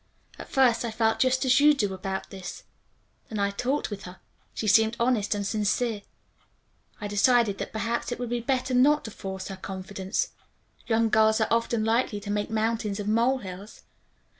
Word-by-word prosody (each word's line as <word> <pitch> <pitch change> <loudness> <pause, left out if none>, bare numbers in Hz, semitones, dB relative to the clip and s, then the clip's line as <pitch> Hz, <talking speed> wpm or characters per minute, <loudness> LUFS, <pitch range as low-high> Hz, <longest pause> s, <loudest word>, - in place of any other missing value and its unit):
"At - - -9
first 245 -4 +3
I 235 - -2
felt 220 0 +1
just 260 +1 +2
as 255 +1 +5
you 295 +1 +6
do 205 -7 -1
about 190 +1 -5
this. 190 -2 -8 0.7
Then 220 - -5
I 200 0 +1
talked 250 +6 -2
with 205 0 -6
her. 180 +1 -10 0.4
She - - -3
seemed 220 +2 +4
honest 235 -4 +1
and 200 -1 -3
sincere. 210 +2 0 1.0
I 210 - -4
decided 205 0 +3
that - - -4
perhaps 230 +2 -2
it - - -2
would 245 -1 -5
be 240 - 0
better 255 +1 -1
not 290 +4 +4
to 220 - -6
force 190 -1 -6
her 195 - -6
confidence. 190 +1 -3 0.6
Young 225 0 +2
girls 220 0 +4
are 220 - +1
often 230 -1 +1
likely 225 -2 +1
to 205 0 -5
make 205 +1 -1
mountains 220 -2 -1
of 205 - -4
mole 235 +5 +3
hills. 195 -2 -10
220 Hz, 185 wpm, -26 LUFS, 200-240 Hz, 1.0 s, you